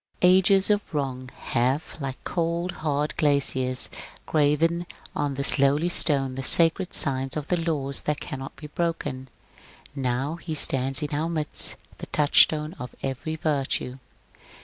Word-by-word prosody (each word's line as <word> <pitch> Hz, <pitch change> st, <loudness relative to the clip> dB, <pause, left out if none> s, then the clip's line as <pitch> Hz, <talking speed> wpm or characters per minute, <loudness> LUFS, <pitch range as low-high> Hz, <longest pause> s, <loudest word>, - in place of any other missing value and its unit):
Ages 190 Hz, +2 st, +5 dB
of 205 Hz, -5 st, -1 dB
wrong 130 Hz, -3 st, -3 dB, 0.2 s
have, 130 Hz, +5 st, 0 dB
like 135 Hz, -2 st, -4 dB
cold, 170 Hz, +1 st, -2 dB
hard 150 Hz, -1 st, -1 dB
glaciers, 130 Hz, -3 st, +1 dB, 0.4 s
graven 165 Hz, +3 st, +1 dB, 0.3 s
on 145 Hz, -2 st, -1 dB
this 140 Hz, +1 st, 0 dB
lowly 145 Hz, +5 st, +3 dB
stone 135 Hz, -6 st, +2 dB
the 135 Hz, -, -5 dB
sacred 170 Hz, +6 st, +3 dB
signs 135 Hz, 0 st, +3 dB
of 150 Hz, -1 st, -5 dB
the 170 Hz, -2 st, 0 dB
laws 140 Hz, -3 st, -2 dB
that 150 Hz, -1 st, -2 dB
cannot 135 Hz, -2 st, -7 dB
be 150 Hz, -, -11 dB
broken; 150 Hz, -5 st, -3 dB, 0.6 s
now 135 Hz, +3 st, -2 dB
he 165 Hz, -2 st, -5 dB
stands 135 Hz, 0 st, +3 dB
in 145 Hz, -, -4 dB
our 155 Hz, +3 st, -1 dB
midst 155 Hz, -3 st, -2 dB, 0.2 s
the -, -, -7 dB
touchstone 150 Hz, +1 st, +4 dB
of 125 Hz, -, -8 dB
every 135 Hz, +4 st, -3 dB
virtue. 140 Hz, -4 st, -2 dB
145 Hz, 140 wpm, -25 LUFS, 135-165 Hz, 0.6 s, Ages